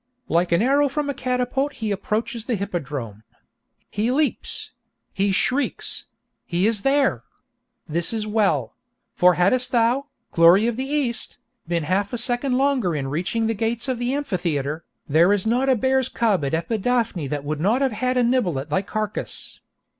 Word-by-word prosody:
Like 175 +1 +1
an 170 +5 +3
arrow 280 +3 +3
from 285 +1 -2
a - - -5
catapult 255 +2 -1
he 220 -4 -3
approaches 220 +4 -2
the 240 - 0
hippodrome! 145 - -4 0.7
He 215 +3 0
leaps!—he 250 -7 -2
shrieks!—he 195 -5 -2
is 220 -2 +2
there! 275 +2 +2 0.6
This 170 +1 -1
is 220 -2 -2
well; 200 - +1 0.4
for 180 -1 +4
hadst 245 +9 +2
thou, 245 +3 +2 0.2
'Glory 175 +5 +6
of 235 -1 0
the 260 +3 -3
East,' 280 -6 -2 0.3
been 170 -1 0
half 195 +7 0
a - - -1
second 245 +2 0
longer 260 - +1
in 135 -2 -2
reaching 185 - -1
the 225 - +1
gates 225 +3 -2
of 255 -2 -1
the 245 +1 -1
Amphitheatre, 165 - -2 0.2
there 165 +5 +4
is 205 -1 +1
not 250 +4 +2
a 260 - +5
bear's 260 +2 +1
cub 215 -8 +1
in 140 - -2
Epidaphne 220 - -1
that 145 0 -3
would 150 +1 -3
not 220 - +2
have 265 - +1
had 255 +3 -1
a 250 - +4
nibble 235 - +1
at 140 +3 -6
thy 170 - +2
carcase. 215 +1 -4
220 Hz, 165 wpm, -23 LUFS, 175-255 Hz, 0.7 s, Glory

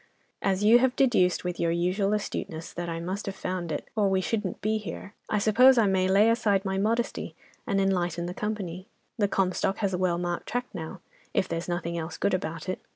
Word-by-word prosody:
"As 195 0 +1
you 225 +3 +7
have 260 0 +2
deduced, 225 -10 +3
with 180 -1 -3
your 170 - +1
usual 180 +4 +1
astuteness, 165 -5 -4
that 175 0 -4
I 165 0 -3
must 185 +5 -4
have 195 - -3
found 185 -3 -3
it, - - -4
or 205 -3 +3
we 190 0 +2
shouldn't 195 -1 -2
be 215 +1 0
here, 200 +1 -7 0.2
I 210 - +1
suppose, 240 +5 +6
I 225 - +5
may 190 -1 +2
lay 205 +4 +5
aside 205 -4 +1
my 190 0 -1
modesty, 230 +4 -1 0.3
and 195 - +1
enlighten 175 -3 0
the 175 - -4
company. 195 -3 -4 0.3
The 205 - +3
'Comstock' 195 0 0
has 200 -3 -1
a 180 - -1
well 180 -2 +1
marked 175 0 -3
track 245 +1 -1
now, 165 0 -7 0.3
if 190 - +2
there's 165 +1 -4
nothing 170 -1 -2
else 160 0 -5
good - - +1
about 165 -2 -3
it. 185 - -3
190 Hz, 215 wpm, -27 LUFS, 175-210 Hz, 0.3 s, you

